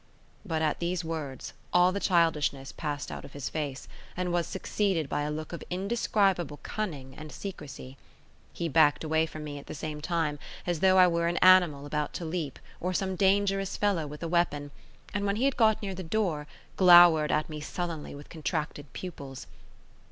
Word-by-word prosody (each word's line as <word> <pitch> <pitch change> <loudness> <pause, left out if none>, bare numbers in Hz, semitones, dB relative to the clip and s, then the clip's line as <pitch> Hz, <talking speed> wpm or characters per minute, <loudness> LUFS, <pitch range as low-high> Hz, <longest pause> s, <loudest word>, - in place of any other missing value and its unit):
But 160 -5 -1
at 155 - 0
these 175 0 -2
words 155 -5 -5 0.2
all 180 +1 +5
the 200 - -2
childishness 155 -7 +1
passed 145 -2 -4
out - - -6
of - - -12
his 140 -2 -4
face, 145 -4 -4 0.3
and 180 -1 -1
was 175 -1 +1
succeeded 190 -4 -1
by 145 - -1
a 145 - -1
look 155 +2 -5
of 170 - -6
indescribable 190 -4 0
cunning 145 -11 -4
and 155 0 -9
secrecy. 140 -8 -8 0.5
He 170 - -3
backed 145 -1 +4
away 160 0 +1
from 155 -1 -8
me 145 -1 -6
at 140 - -14
the - - -6
same 150 0 -5
time, 155 -3 -1 0.3
as 175 -3 -1
though 190 +1 +5
I 185 - +8
were 170 -1 +1
an 175 +1 0
animal 180 -6 +5
about 150 0 -2
to 170 - -5
leap 160 -4 -3 0.2
or 180 +1 -2
some 190 0 -1
dangerous 195 0 +2
fellow 195 -7 +1
with 150 +3 -8
a - - -1
weapon, 155 -4 0 0.4
and 205 - -1
when 200 - +1
he 240 +5 +1
had 275 - +2
got 220 -2 +4
near 195 -1 -3
the 185 - -6
door, 165 -5 -1 0.3
glowered 175 -4 +8
at 155 - +1
me 155 -1 -7
sullenly 165 -2 -5
with 145 +1 -11
contracted 150 -2 -4
pupils. 140 -7 -7
165 Hz, 190 wpm, -29 LUFS, 150-185 Hz, 0.5 s, I